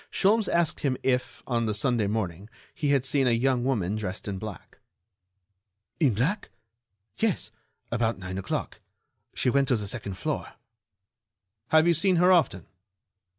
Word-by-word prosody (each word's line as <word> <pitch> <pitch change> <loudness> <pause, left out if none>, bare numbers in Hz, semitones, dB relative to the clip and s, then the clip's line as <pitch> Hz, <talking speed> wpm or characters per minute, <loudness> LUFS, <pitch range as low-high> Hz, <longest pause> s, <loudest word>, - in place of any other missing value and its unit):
Sholmes 210 +2 +3
asked 170 -2 +1
him 130 -3 0
if, 130 -1 -1
on 115 -3 0
the 105 - -1
Sunday 115 -1 +1
morning, 100 -2 -3 0.2
he 150 -4 -1
had 140 -2 +2
seen 135 0 +2
a 115 0 +2
young 130 -2 +2
woman 105 -7 0
dressed 100 -2 -5
in 100 -2 -3
black. 105 -1 -9 1.2
"In 135 -10 +3
black? 150 - 0 0.7
Yes, 210 - 0 0.4
about 115 -3 0
nine 95 0 -5
o'clock. 95 - -4 0.6
She 125 - +2
went 140 0 +2
to 130 - +3
the 105 -3 -3
second 100 -3 -6
floor." - - -3 1.1
"Have 160 0 +5
you 170 - +5
seen 185 +3 +2
her 180 +2 +5
often?" 160 - +3
125 Hz, 150 wpm, -27 LUFS, 105-150 Hz, 1.2 s, Have